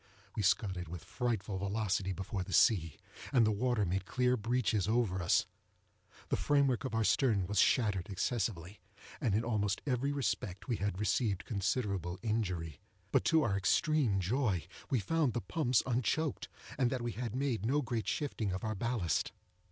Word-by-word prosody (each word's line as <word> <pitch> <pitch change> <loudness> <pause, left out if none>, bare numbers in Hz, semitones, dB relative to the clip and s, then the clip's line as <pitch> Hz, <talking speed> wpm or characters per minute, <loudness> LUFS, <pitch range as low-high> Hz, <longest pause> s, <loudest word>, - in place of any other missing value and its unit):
We 110 - -1
scudded 95 -2 +1
with 85 0 -7
frightful 110 -6 -2
velocity 100 -1 -1
before 95 +1 -4
the 95 +1 -5
sea, 85 - +4 0.3
and 120 -4 +5
the 110 - +3
water 110 0 +1
made 95 +1 -2
clear 125 -1 +2
breaches 115 -3 0
over 110 -5 +1
us. 85 - +3 0.8
The - - +2
frame 145 -1 +3
work 130 -2 0
of 130 - -3
our 115 - +2
stern 105 -1 +2
was 105 +3 0
shattered 105 -5 +2
excessively, 100 -2 -2 0.4
and, 105 -5 +1
in 110 - +1
almost 105 -4 0
every 135 0 0
respect, 110 -9 -2
we 120 -4 0
had 100 -2 -2
received 105 -1 0
considerable 100 -4 -1
injury; 90 -10 -2 0.3
but - - +3
to 160 -1 +4
our 105 -7 +1
extreme 110 +3 +2
joy 100 - 0 0.2
we 130 - +2
found 145 - +1
the 120 - 0
pumps 130 -5 +1
unchoked, 135 +5 0 0.3
and 125 -2 +3
that 125 -2 -2
we 120 - -2
had 120 0 -4
made 130 -6 -1
no 140 +6 +1
great 120 -3 -3
shifting 115 -9 -1
of 95 0 -4
our 110 -1 -1
ballast. 105 - -1
110 Hz, 170 wpm, -33 LUFS, 95-125 Hz, 0.8 s, and